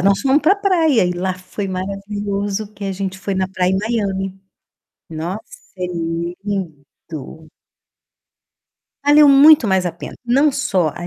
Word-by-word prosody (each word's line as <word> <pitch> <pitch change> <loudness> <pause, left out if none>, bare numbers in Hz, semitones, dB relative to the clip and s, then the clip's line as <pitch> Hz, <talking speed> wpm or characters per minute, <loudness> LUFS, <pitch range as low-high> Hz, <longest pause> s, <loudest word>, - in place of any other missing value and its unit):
nós 195 +1 +3
fomos 275 +2 +3
pra 330 +7 +4
praia 335 - +2
e 180 - 0
lá 180 +1 -2
foi 185 +2 -6
maravilhoso, 200 +2 -4
que 205 -1 -8
a 195 - -2
gente 190 0 -4
foi 195 0 -3
na 185 0 -1
praia 185 -1 0
em 190 - +1
Miami. 195 -3 -2 0.7
Nossa, 165 +6 -4 0.4
é 180 -1 -2 0.6
lindo! 160 -4 -7 1.5
Valeu 290 0 +6
muito 280 -1 +7
mais 190 -2 +1
a 175 - -2
pena, 170 - -9
não 270 +5 +3
só 185 - 0
a 175 - -6
195 Hz, 145 wpm, -19 LUFS, 185-230 Hz, 1.5 s, muito